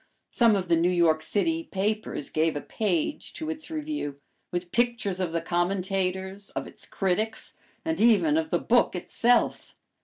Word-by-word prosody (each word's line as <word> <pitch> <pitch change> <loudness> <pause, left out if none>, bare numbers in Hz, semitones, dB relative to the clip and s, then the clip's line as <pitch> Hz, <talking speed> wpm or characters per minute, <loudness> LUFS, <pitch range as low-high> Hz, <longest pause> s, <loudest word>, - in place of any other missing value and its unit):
Some 230 -3 +4
of 185 -2 -1
the 170 - +4
New 170 +2 +3
York 170 -3 +3
city 325 - 0
papers 210 -5 -2
gave 160 0 +1
a 145 - -2
page 200 - -2
to 315 0 -4
its 315 -1 -7
review, 300 - -4 0.3
with 175 0 -3
pictures 235 -5 0
of 180 -3 -1
the 165 0 -1
commentators, 190 +2 -1
of - - -2
its - - -11
critics, 210 +4 -1 0.3
and 320 0 -1
even 235 +7 +5
of 320 0 0
the - - +2
book - - +2
itself. 240 +1 +1
195 Hz, 160 wpm, -27 LUFS, 175-240 Hz, 0.3 s, even